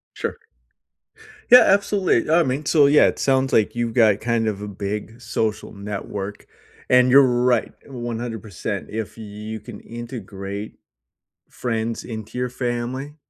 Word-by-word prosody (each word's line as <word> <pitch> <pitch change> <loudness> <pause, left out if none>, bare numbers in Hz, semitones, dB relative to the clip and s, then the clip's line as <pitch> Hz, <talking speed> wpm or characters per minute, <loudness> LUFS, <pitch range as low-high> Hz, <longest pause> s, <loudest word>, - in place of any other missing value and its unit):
Sure. - - -4 1.1
Yeah, 250 +1 +11
absolutely. 195 - +2
I 170 0 +5
mean, 140 +3 -2
so, 145 -3 +5
yeah, 150 +1 +6
it - - -2
sounds 135 -1 +1
like 110 - +3
you've 120 -1 -1
got 110 -4 +4
kind 115 -1 0
of 105 -1 -2
a 105 - -5
big 105 +4 -5
social 110 -2 -2
network, 100 0 -6 0.4
and 125 0 +5
you're 140 +2 +8
right, 125 -1 +2
100%. 115 - -5
If 110 0 -5
you 110 0 -7
can 115 -4 -10
integrate 105 -4 -7 0.8
friends 115 -1 -3
into 110 +1 -7
your 125 0 -1
family, 125 +4 -4
115 Hz, 135 wpm, -22 LUFS, 105-125 Hz, 1.1 s, Yeah